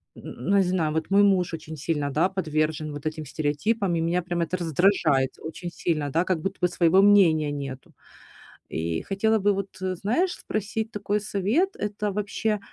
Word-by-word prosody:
н 125 - -9
н - - +5
не - - +6
знаю, 175 -4 0
вот 160 - -2
мой 200 +1 +5
муж 180 -4 +2
очень 160 0 -9
сильно, 145 -1 -2
да, 165 +6 +2
подвержен 155 -4 -1
вот 145 +1 -5
этим 155 -1 -4
стереотипам, 170 - -1
и 165 - 0
меня 175 +2 +1
прям 175 0 -2
это 170 +2 -1
раздражает 165 -5 +2
очень 170 +2 -7
сильно, 155 -6 -2
да, 165 +4 +2
как 185 -3 0
будто 195 +4 -4
бы 180 - +4
своего 175 +1 +4
мнения 175 -7 +5
нету. 135 -2 -7 0.8
И 80 0 -2
хотела 220 +3 +1
бы 205 +1 +3
вот, 195 0 -2
э, 185 -1 -1
знаешь, 315 - 0
спросить 215 +2 -3
такой 210 0 -1
совет: 210 - 0
это 210 -1 -3
вообще 210 +1 -1
180 Hz, 185 wpm, -25 LUFS, 155-200 Hz, 0.8 s, не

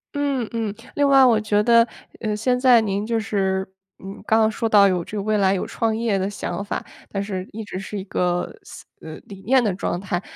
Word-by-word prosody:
嗯 280 -5 -1
嗯。 225 -3 -3 0.2
另 285 -1 +3
外 270 -1 +6
我 230 -4 +4
觉 210 -1 +1
得， 230 +1 +5 0.3
呃， 215 -2 -2
现 250 +3 0
在 250 -3 +6
您 205 -1 -2
就 230 0 0
是， 190 -3 -1 0.4
嗯， 195 +1 -7
刚 220 - +4
刚 220 0 +3
说 225 +1 -2
到 205 -2 +6
有 180 -2 0
这 - - -8
个 200 - -2
未 215 0 +1
来 195 -1 +3
有 190 - -2
创 225 -1 -1
业 225 -3 0
的 190 +1 -1
想 200 0 -4
法， 205 - -4 0.2
但 200 -1 -3
是 190 -2 -5
一 220 +1 -6
直 185 -2 -6
是 200 +2 -6
一 190 - -4
个 180 -2 -1
思 - - -12 0.2
呃， 160 -1 -8
理 195 -1 -11
念 255 +5 +3
的 205 -5 0
状 180 -2 -3
态。 185 -2 -3
210 Hz, 250 characters per minute, -22 LUFS, 195-230 Hz, 0.4 s, 外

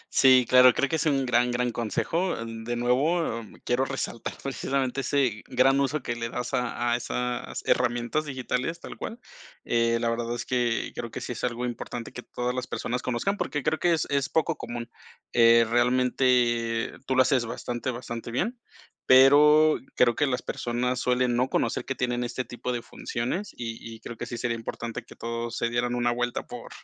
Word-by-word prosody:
Sí, 130 -2 +6
claro, 125 0 +7
creo 140 - +2
que 160 - +1
es 160 - 0
un 135 -3 +2
gran, 125 0 +2
gran 125 0 0
consejo. 160 - -1
Eh, 115 - -4
de 115 +1 -5
nuevo, 125 +3 +1
eh, 110 - -11 0.2
quiero 125 +2 +2
resaltar 135 -3 -4
precisamente, 135 0 -1
ese 130 -5 0
gran 135 +2 +3
uso 140 +1 0
que 120 - -2
le 115 0 -4
das, 125 +1 -4
a 120 -1 0
a - - +3
esas 125 0 -3
herramientas 120 +4 +1
digitales 130 +3 -2
tal - - -9
cual. 230 - -6 0.5
Eh, 115 0 +2
la 115 0 0
verdad 115 0 -2
es - - -5
que 120 -2 0
creo 115 - -5
que - - -6
sí - - -5
es 120 - -6
algo 125 0 -1
importante, 120 -1 -5
que 125 - -8
todas 125 0 -3
las 125 -1 -3
personas 125 +1 -3
conozcan, 165 +12 -1
porque, 145 -3 -2
creo 155 +3 0
que 175 -1 +3
es 160 - 0
es 140 +1 +1
poco 160 0 +1
común. 120 -4 -6 0.5
Eh, 115 0 +6
realmente 120 -1 +2 0.2
tú 130 - +1
lo 130 - +6
haces 130 -4 +1
bastante, 120 +2 -4
bastante 120 -2 -5
bien, 220 - -2 0.5
pero, 150 +4 +7 0.2
creo 120 -1 +4
que 145 - +2
las 125 -2 -1
personas 125 +1 -2
suelen 125 -1 +1
no 125 +2 +1
conocer - - 0
que 135 - -3
tienen 125 -1 -1
este 125 +1 -3
tipo 120 +2 -5
de 120 -1 -3
funciones, 145 - -4
y 115 -1 -7
y 110 - -14
creo 115 - -8
que 120 - -6
sí 120 0 -5
sería 115 -1 -1
importante, 115 0 -5
que - - -15
todos 115 0 -4
se 115 - 0
dieran 120 +1 0
una 120 0 +1
vuelta 120 0 -2
por - - -9
125 Hz, 195 wpm, -27 LUFS, 120-135 Hz, 0.5 s, claro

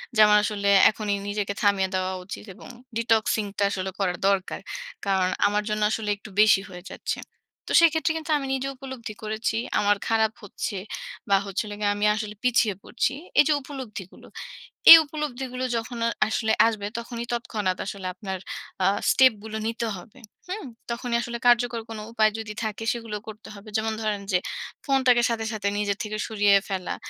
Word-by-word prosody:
যে - - +1
আমার 210 0 +6
আসলে 205 -1 -2 0.2
এখনই 210 -2 -2
নিজেকে 205 0 -2
থামিয়ে 200 -2 +2
দেওয়া 185 0 -1
উচিত 195 - -7
এবং - - -13 0.3
detoxing 220 -2 +1
টা - - +1
আসলে 190 -1 -3
করার 180 -3 0
দরকার। 195 -2 0 0.5
কারণ, 190 -2 +2 0.2
আমার 205 +1 0
জন্য 210 0 -1
আসলে 220 -1 -2
একটু 210 - -12
বেশি 210 -2 +6
হয়ে 180 -1 -10
যাচ্ছে। - - -4 0.5
তো - - -5
সেক্ষেত্রে 320 -1 +3
কিন্তু 320 0 -5
আমি 280 - -4
নিজে 270 0 -2
উপলব্ধি 260 -5 -8
করেছি। 220 +1 -2 0.2
আমার 205 0 +3
খারাপ 220 -1 +2
হচ্ছে, 205 +1 -5 0.5
বা 200 - +6
হচ্ছিল 200 +2 -3
গিয়ে 205 -1 +1
আমি 205 +1 0
আসলে 215 -1 -5
পিছিয়ে 235 -4 +3
পড়ছি। 245 - -1 0.3
এই - - +9
যে 310 - +4
উপলব্ধিগুলো, 255 -9 -9 0.6
এই 330 - +15
উপলব্ধিগুলো 265 -4 -4
যখন 230 +1 -4
আ - - +2 0.2
আসলে 220 0 +1
আসবে, 215 -3 -1
তখনই 235 0 -6
তৎক্ষণাৎ 215 -6 -1
আসলে 195 -1 -6
আপনার 190 0 -5 0.5
আ - - +4 0.2
স্টেপ 260 -1 +6
গুলো 220 0 -5
নিতে 230 +1 -2
হবে। 185 +7 -13 0.3
হুম? 390 +3 -4 0.3
তখনই 235 0 -1
আসলে 240 0 -4
কার্যকর 240 -1 +4
কোনো 220 -1 -6
উপায় 215 -2 +4
যদি 220 -1 -5
থাকে, 220 +1 -4
সেগুলো 230 -3 -5
করতে 220 +1 -10
হবে। 205 +1 -13
যেমন 220 0 0
ধরেন 210 -2 -1
যে, 180 - +4 0.5
ফোনটাকে 260 -3 +3
সাথে, 225 -1 -1
সাথে 205 -2 -1
নিজের 205 -1 -1
থেকে 215 0 -4
সরিয়ে 205 -2 +3
ফেলা, 190 -2 -3
215 Hz, 175 wpm, -25 LUFS, 205-235 Hz, 0.6 s, এই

